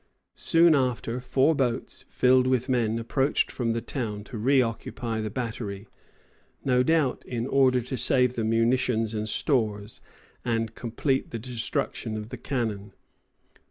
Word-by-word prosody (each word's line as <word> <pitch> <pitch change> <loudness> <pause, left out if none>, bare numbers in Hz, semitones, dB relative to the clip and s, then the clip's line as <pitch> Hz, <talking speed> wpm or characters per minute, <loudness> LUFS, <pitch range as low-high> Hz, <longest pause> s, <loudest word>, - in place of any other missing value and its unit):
Soon 165 0 +4
after, 125 -3 0
four 130 +4 +2
boats, 125 -5 -2
filled 130 0 +3
with 130 -1 +1
men, 115 -3 +1
approached 135 +5 0
from 120 -3 -1
the 115 - -3
town 105 -6 -4
to 120 - -10
re 130 +5 +3
occupy 115 -1 -2
the 110 - -3
battery, 110 -4 -5 0.8
no 125 -2 +3
doubt 150 -1 +1
in 120 -1 -3
order 130 -2 +3
to 125 +2 -5
save 125 0 +3
the 115 - -2
munitions 115 0 +1
and 110 0 -2
stores, 105 -6 -1 0.4
and 115 -1 -1
complete 130 +4 -1
the 115 - -4
destruction 115 -1 -3
of 105 +1 -6
the - - -6
cannon. 110 -7 -3
120 Hz, 145 wpm, -26 LUFS, 115-130 Hz, 0.8 s, Soon